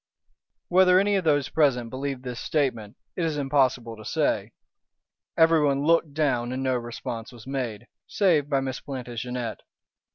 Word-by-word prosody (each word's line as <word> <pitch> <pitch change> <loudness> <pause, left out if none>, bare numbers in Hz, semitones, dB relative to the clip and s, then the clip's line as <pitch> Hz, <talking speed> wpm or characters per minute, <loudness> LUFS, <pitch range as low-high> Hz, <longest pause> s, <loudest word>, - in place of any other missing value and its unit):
Whether 180 0 +5
any 205 +1 +2
of 190 -3 0
those 145 -3 +2
present 125 -7 +1
believed 135 -1 -4
this 125 -2 -5
statement 125 -9 -1 0.2
it 175 - -2
is 160 -2 -1
impossible 130 -5 +1
to 110 - -11
say. 105 - 0 0.9
Everyone 150 -4 +4
looked 165 -3 +2
down 125 -6 0
and 130 +1 -3
no 130 -1 +1
response 120 -1 -5
was 120 -3 -13
made, 125 -5 -4 0.2
save 165 -8 +2
by 135 -2 +2
Miss 130 -1 -4
Plantagenet. 125 -3 -5
135 Hz, 150 wpm, -26 LUFS, 120-150 Hz, 0.9 s, Whether